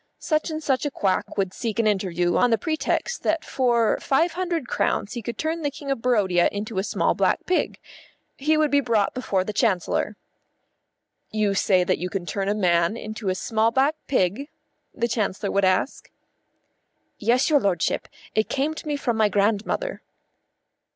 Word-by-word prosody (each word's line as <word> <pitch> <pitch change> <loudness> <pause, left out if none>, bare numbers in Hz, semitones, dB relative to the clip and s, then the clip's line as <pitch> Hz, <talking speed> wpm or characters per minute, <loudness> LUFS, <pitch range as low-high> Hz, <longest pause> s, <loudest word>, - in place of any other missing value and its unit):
Such 310 0 -1
and 315 0 -4
such 265 -3 +1
a 290 - 0
quack 195 -8 -1
would 190 -2 0
seek 225 -3 -3
an 230 - +2
interview 180 -4 +1
on 245 - +4
the 225 - +3
pretext 315 - -1
that 325 0 0
for 235 -4 +2
five 325 +6 +2
hundred 345 -6 -2
crowns 205 -3 -1
he 240 - -4
could 235 +2 -5
turn 320 +1 -2
the 290 - 0
King 280 0 -6
of 270 - -2
Barodia 200 -8 +3
into 205 0 -3
a - - 0
small - - +1
black - - +1
pig. 365 - 0 0.6
He 305 +3 +1
would 310 -1 +2
be 285 - +5
brought 230 -6 +1
before 200 -7 -1
the 210 - -5
Chancellor. 210 -1 0 1.1
"You 215 -2 0
say 190 -2 +3
that - - 0
you 180 - -3
can 185 -1 -4
turn 195 +2 -2
a 205 - +1
man 175 0 +2
into 215 -2 -5
a 185 - 0
small 220 +3 +1
black 270 +6 +2
pig?" 250 - 0 0.4
the 235 - -1
Chancellor 205 -3 -1
would 200 -1 +2
ask. 185 +8 0 1.1
"Yes, 245 +7 +2
your 290 - +6
lordship. 190 -8 0 0.3
It 215 0 +1
came 285 +3 0
to 315 - -9
me 295 - 0
from 245 -5 -1
my 215 -1 +4
grandmother." 210 - 0
225 Hz, 180 wpm, -24 LUFS, 195-280 Hz, 1.1 s, your